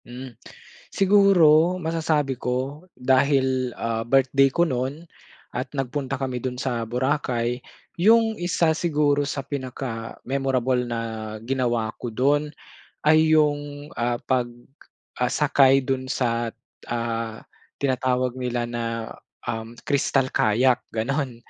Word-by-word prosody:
Hmm, 125 +1 -9 0.6
siguro 185 -4 +5
masasabi 160 -4 0
ko 135 +7 -3
dahil, 130 0 +2
ah, 115 -1 -2
birthday 135 +3 +3
ko 170 +6 +2
nun 135 +3 -3 0.5
at 125 +1 -3
nagpunta 135 +1 -2
kami 130 -2 -3
dun 125 0 -4
sa 120 -3 -2
Boracay. 125 -2 -1 0.4
Yung 225 +3 +5
isa 175 -2 +2
siguro 150 -3 +1
sa 140 -2 -4
pinaka-memorable 130 -1 -2
na 115 -1 -2 0.4
ginawa 120 -4 0
ko 120 - -3
dun 145 +6 +1 0.5
ay 155 +1 +4
yung, 145 -1 +1
ah, 120 0 -1
pag, 130 -2 +1 0.7
ah, 125 0 0
sakay 135 -2 +4
dun 130 0 -2
sa, 120 -3 -1 0.3
ah, 115 -1 -3 0.4
tinatawag 130 -2 0
nila 125 -1 -1
na, 120 0 -3 0.7
um, 115 +1 -4
crystal 135 -2 +1
kayak, 120 +4 +3 0.2
gano'n. 130 +3 -1
130 Hz, 110 wpm, -24 LUFS, 125-145 Hz, 0.7 s, siguro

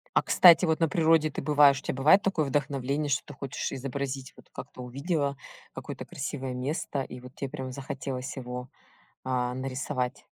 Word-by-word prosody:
А - - +6
кстати 175 0 +7
вот 160 0 +1
на 165 - +3
природе 160 -1 +3
ты - - -4
бываешь, 145 -2 +5
у - - -16
тя - - -2
бывает 155 +10 +5
такое 190 -6 +1
вдохновление, 140 +1 -1
что 140 - +1
ты 145 - -10
хочешь 135 0 -4
изобразить, 135 0 -4
вот - - -18
как-то 125 - -9
увидела 140 +2 -2 0.4
какое-то - - -7
красивое 135 -2 -4
место, 135 +2 -2
и 125 -1 -7
вот 125 +1 -12
те 140 - -4
прям 130 0 -6
захотелось 135 0 -5
его, 125 -1 -6 0.5
а, 125 -1 -1
нарисовать? 130 0 -3
135 Hz, 175 wpm, -28 LUFS, 130-150 Hz, 0.5 s, кстати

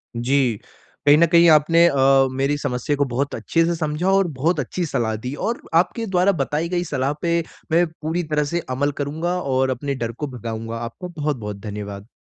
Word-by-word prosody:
जी, 120 -2 +1 0.5
कहीं 145 +1 +7
न 170 - +6
कहीं 170 0 +6
आपने 165 +2 +5
अ, 135 -2 +4
मेरी 135 +2 0
समस्या 140 0 -2
को 145 0 +1
बहुत 135 +3 -2
अच्छे 165 +9 +1
से 170 0 0
समझा 155 +2 -2
और 195 -1 +3
बहुत 160 +4 +1
अच्छी 170 +6 -2
सलाह 115 -7 -1
दी 125 +5 -5
और 235 - -2
आपके 180 +7 +2
द्वारा 190 -1 +3
बताई 150 +5 -1
गई 175 -1 0
सलाह 140 -4 -1
पे 170 0 +1 0.3
मैं 170 +2 +4 0.2
पूरी 160 +3 -1
तरह 150 0 +2
से 170 - +1
अमल 140 +3 0
करूँगा 160 +5 -2
और 130 -2 +1
अपने 140 +2 -2
डर 115 -3 -3
को 145 +6 -5
भगाऊँगा। 115 -2 -5
आपको 120 +10 -7
बहुत-बहुत 145 - -3
धन्यवाद। 100 0 -7
145 Hz, 190 wpm, -22 LUFS, 125-170 Hz, 0.5 s, कहीं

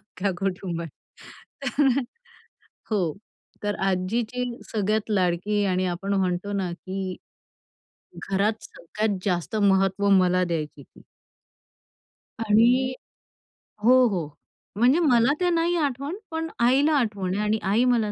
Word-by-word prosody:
अख्ख्या 195 -1 -3
कुटुंबात. 180 -3 -3 0.9
तर 290 -2 +5 1.0
हो, 180 -7 +1 0.5
तर 205 0 -1
आजीची 220 +7 -1 0.3
सगळ्यात 215 +1 0
लाडकी 200 +2 +1
आणि 185 -1 0
आपण 185 +3 -3
म्हणतो 185 +1 -1
ना, 190 -3 -2
की 185 +1 -5 1.1
घरात 205 +3 0
सगळ्यात 205 +3 -3
जास्त 180 +2 -1
महत्त्व 195 0 +2
मला 185 -1 +4
द्यायची 155 -4 -4
ती. - - -20 1.4
आणि 240 +4 +3 0.9
हो, 255 +2 +6
हो, 180 -7 -2 0.5
म्हणजे 250 +9 +4
मला 260 -4 +4
ते 360 - +2
नाही 340 0 +1
आठवत, 285 -1 -1 0.2
पण 325 0 -2
आईला 270 +6 +4
आठवतं 200 -7 -1
आहे 205 - -1
आणि 215 +1 +1
आई 210 +5 +2
मला 230 -4 +2
205 Hz, 115 wpm, -25 LUFS, 185-240 Hz, 1.4 s, हो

